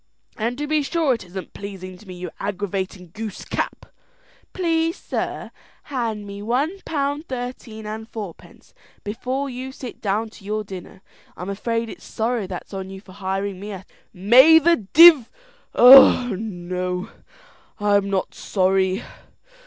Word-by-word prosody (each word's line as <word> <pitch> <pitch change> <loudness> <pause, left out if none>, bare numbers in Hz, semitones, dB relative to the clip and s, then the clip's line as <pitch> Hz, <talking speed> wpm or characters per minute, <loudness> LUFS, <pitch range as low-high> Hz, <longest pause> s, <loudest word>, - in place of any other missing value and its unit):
"And 235 +2 -2
to 295 - -2
be 305 0 +1
sure 305 -1 +1
it 230 - -5
isn't 185 +1 -8
pleasing 190 -2 -8
to 215 - -17
me, 185 - -8
you 180 -1 -7
aggravating 195 -3 -4
goose 220 -2 -6
cap!" - - -3 0.7
"Please, 330 -2 0
sir, - - -4 0.4
hand 225 -5 -2
me 200 0 -8
one 275 - -1
pound 290 +1 -2
thirteen 245 -3 -6
and 220 +1 -6
four 205 -6 -6
pence - - -20 0.3
before 255 +6 -3
you 260 0 -6
sit 255 -2 -9
down 215 +2 -1
to 220 - -16
your 215 +2 -2
dinner. 190 -1 -10 0.3
I'm 180 +3 -5
afraid 230 +3 -2
it's - - -10
sorrow 225 -2 -2
that's 185 +2 -8
on 190 -1 -5
you 190 0 -8
for 190 -1 -16
hiring 195 0 -3
me 205 +1 -6
at 190 - -7
all." - - -23 0.3
"May 245 - +7
the 335 +2 +4
div 285 - +7 0.5
oh 250 -2 +8
no; 180 -1 -4 0.7
I'm 205 -1 +2
not 195 -1 -1
sorry. 190 +1 +1
215 Hz, 155 wpm, -22 LUFS, 195-255 Hz, 0.7 s, oh